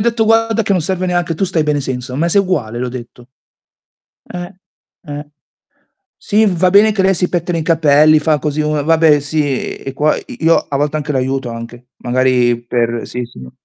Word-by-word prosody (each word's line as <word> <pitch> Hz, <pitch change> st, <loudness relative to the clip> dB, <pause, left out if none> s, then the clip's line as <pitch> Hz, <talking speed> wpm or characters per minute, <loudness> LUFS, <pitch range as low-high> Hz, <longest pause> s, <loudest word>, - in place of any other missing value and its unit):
detto: 230 Hz, -1 st, +1 dB
"Guarda 225 Hz, 0 st, +2 dB
che 200 Hz, -, 0 dB
non 180 Hz, -4 st, +1 dB
serve 185 Hz, +1 st, -2 dB
neanche, 175 Hz, -2 st, -1 dB
tu 195 Hz, -, -1 dB
stai 170 Hz, -4 st, 0 dB
bene 150 Hz, -1 st, 0 dB
senza, 130 Hz, -1 st, -5 dB
ma 165 Hz, +5 st, 0 dB
sei 200 Hz, +3 st, +3 dB
uguale.", 120 Hz, -, -2 dB
le 125 Hz, -, -2 dB
ho -, -, -3 dB
detto. 120 Hz, -1 st, -10 dB, 1.1 s
Eh, 175 Hz, +1 st, -6 dB, 0.6 s
eh. 145 Hz, +1 st, -6 dB, 1.0 s
Sì, 215 Hz, +1 st, +2 dB
va 185 Hz, -1 st, +2 dB
bene 210 Hz, +2 st, +5 dB
che 200 Hz, -, -1 dB
lei 190 Hz, 0 st, +3 dB
si 180 Hz, 0 st, -1 dB
pettina 175 Hz, -1 st, -1 dB
i -, -, -2 dB
capelli, 155 Hz, -1 st, +4 dB
fa 150 Hz, 0 st, +1 dB
così, 150 Hz, +1 st, -2 dB
uhm, 150 Hz, -1 st, 0 dB
vabbè 160 Hz, -2 st, +4 dB
sì 145 Hz, -2 st, -2 dB
e 135 Hz, -, -7 dB
qua 150 Hz, +2 st, +2 dB
i -, -, -7 dB, 0.2 s
io 165 Hz, -, +5 dB
a 140 Hz, -, -4 dB
volte 145 Hz, +2 st, -1 dB
anche 150 Hz, 0 st, -3 dB
l'aiuto, 130 Hz, -1 st, -1 dB
anche. 115 Hz, +1 st, -9 dB
Magari 125 Hz, -1 st, +1 dB
per 120 Hz, -1 st, -1 dB
sì, 125 Hz, 0 st, -5 dB
sì. 65 Hz, -, -12 dB
150 Hz, 200 wpm, -16 LUFS, 130-175 Hz, 1.1 s, bene